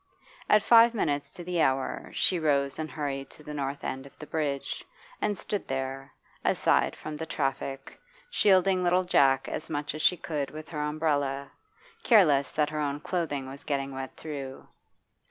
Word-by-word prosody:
At 210 0 +6
five 235 +1 +7
minutes 145 -8 0
to 175 - -7
the 175 -1 0
hour 130 -2 0
she 180 - +2
rose 140 -3 +1
and 155 0 -3
hurried 140 -3 -4
to 150 - -15
the 150 - -7
north 140 -1 -3
end 135 +1 -4
of 135 - -19
the 150 - -8
bridge, 145 -3 -2 0.4
and 205 -1 0
stood 205 - -4
there, 135 0 -4 0.3
aside - - +2
from 155 0 -7
the 160 +1 -5
traffic, 135 -2 -3 0.3
shielding 190 - +4
little 180 +1 +3
Jack 135 -6 +3
as 155 - -5
much 145 0 -2
as 155 - -4
she 180 - +4
could 150 -4 -3
with 155 +2 -9
her 150 -3 -3
umbrella, 145 -2 -1 0.5
careless 150 - +5
that 150 +2 0
her 155 - -3
own 145 -1 -1
clothing 150 -5 -2
was 135 +1 -9
getting 140 -2 -2
wet 130 0 -6
through. 140 -4 -7
150 Hz, 170 wpm, -28 LUFS, 135-165 Hz, 0.5 s, five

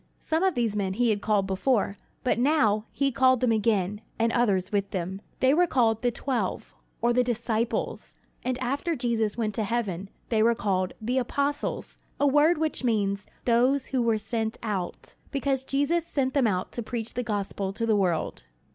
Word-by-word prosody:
Some 320 +1 -1
of 380 -4 +2
these 230 -4 0
men 195 -2 -1
he 235 +2 +2
had 205 -1 -1
called 205 -2 +2
before; 200 +2 +1 0.3
but 250 - +1
now 245 -6 +3
he 275 -1 0
called 260 0 +4
them 250 -1 +2
again, 210 -2 +1 0.2
and 230 0 +2
others 200 -7 +1
with 200 -1 0
them. 190 +1 -4 0.2
They 260 +1 +5
were 350 +3 +4
called 225 -6 +2
"The 245 - +2
Twelve," 235 -3 -3 0.3
or 240 0 +4
"the 250 +1 +3
disciples"; 235 -1 -2 0.3
and 255 0 -1
after 280 +7 -1
Jesus 230 -4 0
went 215 -3 -1
to 220 - -1
heaven, 200 -4 -2 0.2
they 220 -2 +2
were 230 +1 +4
called 190 -3 0
"The 245 +4 0
Apostles," 280 +3 -2 0.2
a 285 - +3
word 295 +4 +4
which 310 -3 -1
means 205 -4 0 0.2
"those 255 +3 +3
who 260 -2 -1
were 230 -2 +2
sent 220 +1 -2
out," 195 -5 -4 0.2
because 275 -1 0
Jesus 285 +5 +1
sent 265 -4 0
them 270 -5 +3
out 185 -3 -1
to 240 - -3
preach 230 0 -4
the 245 - -1
gospel 205 -3 -2
to 230 +3 -1
the 220 -2 +3
world. 180 -6 0
230 Hz, 185 wpm, -27 LUFS, 205-260 Hz, 0.3 s, They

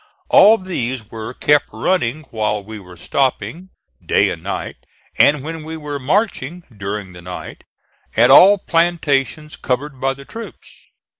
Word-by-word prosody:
All 215 +3 +7
these 130 - -4
were 110 +1 -6
kept 150 -1 +2
running 135 +3 -1
while 105 -2 -1
we 110 +1 -9
were 90 -2 -14
stopping, 140 - -2 0.3
day - - +2
and - - -6
night, - - -5 0.4
and 145 -2 +4
when 160 +1 -6
we 160 +1 -7
were 145 -2 -5
marching, 175 - -1
during 100 -1 -5
the 90 - -12
night, 90 +1 -9 0.5
at - - +6
all 200 +2 +8
plantations 155 -4 0
covered 135 +1 -3
by 135 0 0
the 140 +1 -13
troops. 230 +7 -10
140 Hz, 145 wpm, -19 LUFS, 110-165 Hz, 0.5 s, all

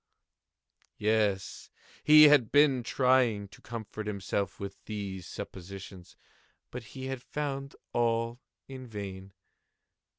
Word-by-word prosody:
Yes, 105 -3 0 0.3
he 155 0 +9
had 145 -7 +6
been 145 -3 +5
trying 125 -5 +2
to 105 - -16
comfort 110 -2 -7
himself 100 -1 -2
with 100 0 -7
these 100 -4 -5
suppositions: 95 0 -9 0.5
but 125 - -5 0.2
he 130 - -5
had 130 -2 -4
found 140 -1 -4 0.2
all 115 0 0 0.3
in 130 -1 -9
vain. 100 -3 -7
110 Hz, 105 wpm, -30 LUFS, 100-130 Hz, 0.5 s, he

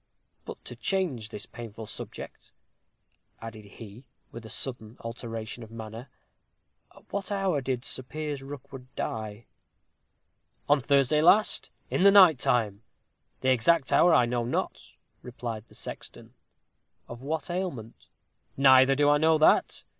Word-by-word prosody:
But - - -10
to - - -9
change 160 - -2
this 105 +1 -7
painful 115 -1 -9
subject," - - -9 0.9
added 115 -2 -9
he, 110 +4 -13 0.2
with 115 - -9
a - - -12
sudden 120 -4 -5
alteration 115 0 -6
of 110 - -10
manner, 115 +2 -9 0.9
"at - - -17
what 200 0 -3
hour 195 -7 0
did 125 -1 -3
Sir - - +1
Piers 150 +1 -5
Rookwood 135 -2 -10
die?" 110 0 -5 1.2
"On 145 -1 +4
Thursday 140 +2 +3
last, 205 +6 +4 0.2
in - - 0
the 200 - +8
night 185 -9 +7
time. 110 -5 0 0.6
The 130 - +2
exact 135 +4 +2
hour 175 - +5
I 125 -7 +5
know 120 0 -1
not," 120 - -4 0.3
replied 115 -3 -7
the - - -17
sexton. - - -9 0.7
"Of 120 0 -9
what 160 +5 -3
ailment?" 175 - -5 0.5
"Neither 130 0 +6
do 145 +1 +3
I 145 0 +4
know 160 +1 +4
that. 155 - +3
130 Hz, 140 wpm, -27 LUFS, 115-150 Hz, 1.2 s, the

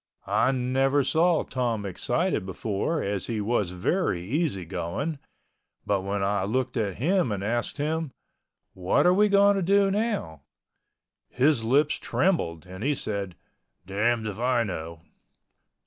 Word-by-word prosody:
I 130 - +2
never 135 +2 +1
saw 165 +4 +2
Tom 120 -5 -2
excited 110 - -1
before 100 - -2
as 100 -2 -2
he 115 -2 -2
was 105 -3 0
very 90 - -1
easy 135 - -1
going, 95 - -3 0.7
but 100 -2 +1
when 100 +1 -2
I 100 0 0
looked 125 +5 -1
at 105 -6 -1
him 170 - +1
and 100 -1 -3
asked 120 +6 -1
him, 155 +1 -1 0.6
"What 90 0 +1
are 180 - +6
we 210 +2 +4
going 200 0 +5
to - - 0
do 195 +2 +3
now?" 200 - -2 0.9
his 130 -2 +2
lips 140 +6 +2
trembled 85 - 0
and 95 +3 -8
he 145 +2 +1
said, 100 -7 -4 0.5
"Damned 110 +4 0
if 105 0 -5
I 125 -1 +2
know." 85 -5 -6
120 Hz, 145 wpm, -26 LUFS, 100-155 Hz, 0.9 s, are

